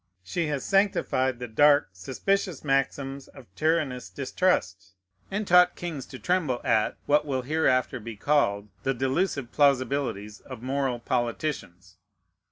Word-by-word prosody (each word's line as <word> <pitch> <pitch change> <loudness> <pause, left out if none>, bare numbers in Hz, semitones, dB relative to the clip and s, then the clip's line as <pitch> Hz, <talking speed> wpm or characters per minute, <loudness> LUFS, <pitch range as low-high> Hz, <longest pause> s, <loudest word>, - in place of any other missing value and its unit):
She 165 - -2
has 145 -3 -2
sanctified 160 -10 +1
the 125 0 -6
dark, 145 +5 +4
suspicious 165 - -2
maxims 135 -1 -1
of 135 -3 -14
tyrannous 155 -6 0
distrust, 100 - -1 0.3
and 205 +2 -2
taught 180 0 +6
kings 160 -7 -6
to - - -9
tremble 165 -9 0
at 110 - +1
(what 150 +1 +3
will 135 -3 -2
hereafter 130 -3 +1
be 115 0 -8
called) 105 -6 +1
the 135 0 -1
delusive 135 0 -1
plausibilities 130 -7 +1
of 125 -3 -11
moral 135 -1 -1
politicians. 115 - -3
135 Hz, 130 wpm, -26 LUFS, 120-150 Hz, 0.3 s, taught